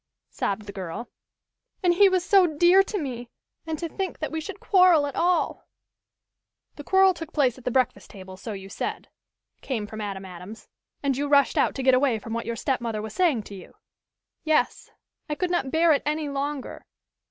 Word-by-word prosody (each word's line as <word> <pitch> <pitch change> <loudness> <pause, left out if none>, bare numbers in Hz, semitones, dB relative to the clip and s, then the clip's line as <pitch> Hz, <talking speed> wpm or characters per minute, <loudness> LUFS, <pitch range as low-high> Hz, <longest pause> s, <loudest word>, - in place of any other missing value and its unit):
sobbed 205 +1 -2
the 200 - -7
girl. 190 +5 -7 0.7
"And 350 -1 +4
he 390 +3 +6
was 370 -1 0
so 390 -3 +5
dear 345 +5 +5
to 405 +2 -3
me! 245 -7 -5 0.4
And 320 -1 -2
to 335 - -4
think 380 +2 -4
that 310 - -4
we 320 0 -3
should 395 +4 -8
quarrel 365 -8 +5
at 285 - -5
all 355 +1 0 0.5
" - - -56
"The 290 - -8
quarrel 380 +3 +4
took 330 -1 -8
place 260 -4 +1
at 250 - -19
the - - +1
breakfast 255 0 0
table, 190 -1 -11
so 215 +3 -7
you 195 -1 -8
said," 195 - -5 0.5
came 230 -6 -3
from 215 +1 -8
Adam 195 -2 -5
Adams. 185 +4 -10 0.4
"And 275 -2 +1
you 285 +2 -2
rushed 280 -1 +4
out - - +2
to 265 - -3
get 260 0 +5
away 255 -2 +3
from 225 +1 -7
what 230 - -3
your 235 - -2
stepmother 235 -4 -2
was 215 0 -6
saying 315 -12 +2
to 205 - -11
you?" 190 -2 -12 0.7
"Yes. 310 -1 0 0.4
I 300 - -1
could 360 +2 -2
not 345 -7 0
bear 325 +3 +3
it 280 - +1
any 300 0 -2
longer." 280 0 -4
280 Hz, 200 wpm, -25 LUFS, 225-335 Hz, 0.7 s, he